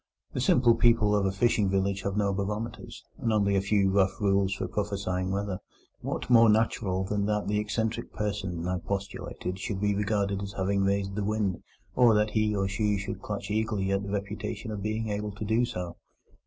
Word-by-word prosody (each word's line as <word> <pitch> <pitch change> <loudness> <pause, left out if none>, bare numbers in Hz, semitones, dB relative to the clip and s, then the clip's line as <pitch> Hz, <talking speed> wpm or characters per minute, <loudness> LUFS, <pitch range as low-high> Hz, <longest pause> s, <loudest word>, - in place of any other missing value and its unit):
The - - -1
simple 120 -2 +5
people 115 -3 +4
of 100 -2 +2
a - - +1
fishing 105 0 +2
village 95 0 0
have 100 +1 -2
no 100 -1 +2
barometers, 105 +4 -4 0.2
and 115 - 0
only 100 -2 +2
a 95 - +3
few 100 -1 +2
rough 95 +1 +2
rules 100 -2 +2
for 100 - -2
prophesying 100 -3 -2
weather. 100 -1 -2 0.4
What - - -4
more 115 -2 +7
natural 105 -3 +1
than 100 +1 -1
that 105 -1 0
the 105 0 +1
eccentric 110 +2 -2
personage 100 -5 -3
I 90 0 -1
postulated 95 -1 -4
should 95 0 -3
be 105 0 +1
regarded 100 -1 0
as 100 -1 -5
having 100 +1 0
raised 100 0 0
the 105 +1 -2
wind, 105 -3 -1 0.3
or 120 -3 +6
that 105 0 +2
he 110 -1 +1
or 95 -1 +1
she 105 +1 0
should 100 +1 -5
clutch - - -5
eagerly 105 -3 0
at 100 0 +1
the 100 - -6
reputation 105 +2 -4
of 105 -2 -4
being 110 +1 -2
able 105 0 -3
to 105 +1 -5
do 110 +3 +2
so? 90 -8 -5
100 Hz, 195 wpm, -28 LUFS, 95-105 Hz, 0.4 s, more